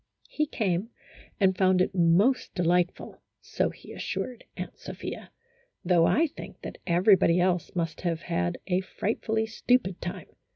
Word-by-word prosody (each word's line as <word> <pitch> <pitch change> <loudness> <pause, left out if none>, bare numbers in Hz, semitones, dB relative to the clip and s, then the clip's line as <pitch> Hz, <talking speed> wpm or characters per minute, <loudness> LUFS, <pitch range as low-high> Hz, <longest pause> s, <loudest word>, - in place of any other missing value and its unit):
He 305 0 0
came, 200 - -1 0.5
and 190 -2 +4
found 185 0 +3
it 185 +2 +1
most 190 +9 +3
delightful 180 0 0 0.2
(so - - -1
he - - -12
as - - -7
sured 250 -2 -4 0.2
Aunt - - -6
Sophia), - - -7 0.6
though 175 -2 +4
I 325 - +4
think 305 - -9
that - - -7
everybody 180 0 +4
else 180 -1 0
must 165 -2 -2
have 170 -2 -1
had 85 0 -1
a 185 0 +1
frightfully 220 +3 -2
stupid 225 -3 0
time. 175 - -6
185 Hz, 150 wpm, -27 LUFS, 175-220 Hz, 0.6 s, and